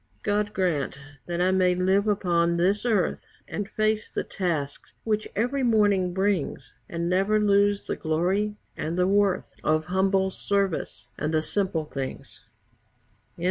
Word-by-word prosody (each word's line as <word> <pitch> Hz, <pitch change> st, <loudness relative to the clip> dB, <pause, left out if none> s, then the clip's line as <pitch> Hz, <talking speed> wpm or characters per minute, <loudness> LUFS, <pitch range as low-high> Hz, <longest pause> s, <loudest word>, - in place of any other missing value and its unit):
God 210 Hz, 0 st, 0 dB
grant 160 Hz, -7 st, -1 dB, 0.3 s
that 175 Hz, 0 st, -2 dB
I 185 Hz, +1 st, +3 dB
may 185 Hz, -1 st, +3 dB
live 190 Hz, +3 st, +2 dB
upon 170 Hz, -4 st, +2 dB
this 195 Hz, +7 st, +1 dB
earth 205 Hz, -7 st, 0 dB, 0.2 s
And 205 Hz, -1 st, -4 dB
face 215 Hz, 0 st, 0 dB
the -, -, -2 dB
tasks 160 Hz, -7 st, -3 dB
which 215 Hz, -1 st, -1 dB
every 250 Hz, +6 st, 0 dB
morning 205 Hz, -6 st, +3 dB
brings, 190 Hz, -8 st, -1 dB
And 170 Hz, 0 st, -2 dB
never 195 Hz, +4 st, +2 dB
lose 205 Hz, -1 st, +3 dB
the -, -, -3 dB
glory 185 Hz, +6 st, 0 dB, 0.2 s
and 165 Hz, +3 st, -3 dB
the 180 Hz, -, +3 dB
worth 200 Hz, -1 st, +1 dB
Of 155 Hz, 0 st, +2 dB
humble 190 Hz, +1 st, +1 dB
service 200 Hz, -3 st, -1 dB
and 155 Hz, -, -1 dB
the 155 Hz, -1 st, +1 dB
simple 185 Hz, -4 st, -1 dB
things. 135 Hz, -3 st, -7 dB
190 Hz, 140 wpm, -26 LUFS, 170-205 Hz, 0.3 s, I